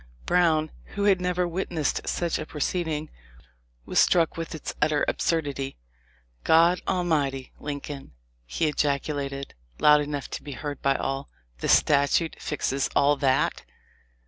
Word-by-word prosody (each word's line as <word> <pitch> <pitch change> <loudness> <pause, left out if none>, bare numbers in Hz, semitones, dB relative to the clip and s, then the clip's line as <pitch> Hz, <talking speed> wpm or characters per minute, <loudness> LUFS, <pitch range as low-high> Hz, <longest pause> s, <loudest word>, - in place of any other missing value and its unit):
Brown, 160 -3 +2 0.2
who 200 - -1
had 195 -3 +4
never 180 0 0
witnessed 170 -4 -2
such 170 -2 -1
a 155 - -4
proceed 170 +3 -2
ing, 155 0 -3 0.7
was - - +1
struck 165 -3 +4
with 165 0 -5
its 155 - -5
utter 150 -1 +2
absurdity. 145 -4 -1 0.7
'God 170 +3 +5
Almighty! 150 -8 0
Lin 145 -1 -4
coln,' 135 - -8 0.3
he 65 - 0
ejaculated, 140 -1 -2 0.3
loud 150 0 +6
enough 145 -1 -4
to - - -4
be 145 - -7
heard 145 +1 -6
by 135 0 +2
all, 135 +1 -3 0.3
'the - - -2
statute 145 +3 +3
fixes 140 -2 -1
all 145 +1 +4
that!' 135 -2 +1
150 Hz, 140 wpm, -26 LUFS, 140-165 Hz, 0.7 s, loud